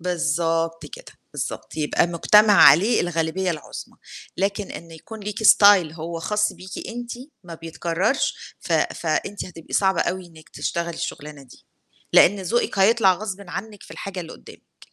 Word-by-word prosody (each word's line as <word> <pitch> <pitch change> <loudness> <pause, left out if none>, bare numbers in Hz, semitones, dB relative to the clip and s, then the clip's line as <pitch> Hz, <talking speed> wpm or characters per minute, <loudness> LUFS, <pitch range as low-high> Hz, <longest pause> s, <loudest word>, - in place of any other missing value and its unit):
بالضبط 165 -1 -1
كده، - - -12 0.2
بالضبط، - - -6
يبقى 155 +2 +1
مجتمع 210 +5 +4
عليه 200 - +6
الغالبية 175 +2 -1
العُظمى، 160 -3 -8 0.4
لكن 200 +1 -2
إن 170 0 -9
يكون 210 +7 -11
ليكِ 210 +2 -5
style 200 -7 +6
هو 165 +1 -6
خاص 210 +4 0
بيكِ 185 +1 -9
أنتِ 240 +1 -6 0.3
ما 170 - -9
بيتكرّرش، 165 - -2
ف - - -5
فأنتِ 205 +1 -1
هتبقى 165 -3 -12
صعبة 190 -1 +2
أوي 185 0 -4
إنِّك 160 -1 -17
تشتغلي 170 0 -4
الشُغلانة 150 -2 -7
دي، 125 - -18 0.5
لإن 200 +3 +5
ذوقِك 215 +2 -1
هيطلع 195 -1 +4
غصبٍ 195 +1 -6
عنِّك 210 +1 -7
في - - -16
الحاجة 190 -2 -6
اللي 165 - -9
قُدّامِك. - - -17
180 Hz, 150 wpm, -22 LUFS, 165-205 Hz, 0.5 s, عليه